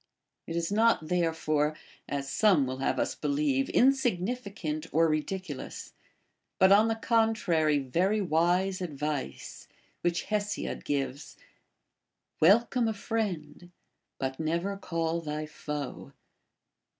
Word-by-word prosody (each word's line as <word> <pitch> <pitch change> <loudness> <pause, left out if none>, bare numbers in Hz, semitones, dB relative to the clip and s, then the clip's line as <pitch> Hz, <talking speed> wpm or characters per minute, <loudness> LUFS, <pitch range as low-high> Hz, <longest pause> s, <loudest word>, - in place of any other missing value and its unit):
It 165 - -4
is 170 +2 -1
not 215 -7 +3
therefore 155 -3 +1 0.3
(as 140 -1 -3
some 185 -4 +3
will 130 0 -4
have 135 - 0
us - - 0
believe) 145 -2 0
insignificant 200 - 0
or 165 +1 +4
ridiculous, 155 0 -4 0.6
but 190 0 +5
on 210 +3 +6
the 225 - +1
contrary 220 -10 +2
very 175 +11 +1
wise 180 +2 +1
advice, 150 - -4 0.3
which 175 0 0
Hesiod 210 -1 -2
gives, 140 -1 -3 0.5
— - - -56
Welcome 230 +7 +4
a 220 - -1
friend, 180 -7 -3 0.5
but 130 0 -3
never 170 +5 -1
call 165 -3 -2
thy 155 -1 -4
foe. 150 -2 -6
165 Hz, 115 wpm, -29 LUFS, 150-200 Hz, 0.6 s, on